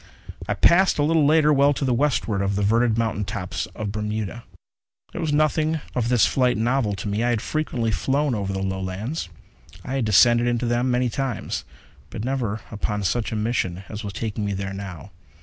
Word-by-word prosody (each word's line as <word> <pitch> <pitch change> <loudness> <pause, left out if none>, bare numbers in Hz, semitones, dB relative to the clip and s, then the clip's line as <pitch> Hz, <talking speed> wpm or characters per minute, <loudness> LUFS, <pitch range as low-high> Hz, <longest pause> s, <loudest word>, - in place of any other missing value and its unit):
I - - 0
passed, 185 +3 +4
a 145 - +2
little 155 -1 +3
later, 150 0 +5
well 140 +1 +4
to 140 - -2
the 130 - +2
westward 120 -6 +1
of 100 0 0
the 100 - 0
verdured 115 +2 +2
mountain 110 -3 0
top 100 -3 -5 0.2
of 110 - -4
the 100 - -3
Bermudas. 105 +1 -3 0.7
There - - -5
was 160 -2 -1
nothing 155 +1 +2
of 120 -1 0
this 125 -3 +4
flight 125 -3 +2
novel 115 -2 +1
to 100 - -6
me. 105 +3 -1
I 120 - +2
had 120 -2 +1
frequently 120 -4 -1
flown 140 +6 0
over 100 -3 -2
the 95 0 -2
Lowlands; 95 - -3 0.6
I 135 - -2
had 130 - 0
descended 120 +3 +5
into 120 0 0
them 120 +2 +1
many 125 0 +1
times. 135 -2 -3 0.4
But 110 - -5
never 120 -5 -2
upon 105 -1 -2
such 115 +4 0
a - - -2
mission 105 -5 -1
as 110 0 -6
was 100 -1 -5
taking 110 +1 -3
me 100 -1 -1
there 95 0 -4
now. 95 -7 -8
115 Hz, 200 wpm, -23 LUFS, 105-135 Hz, 0.7 s, later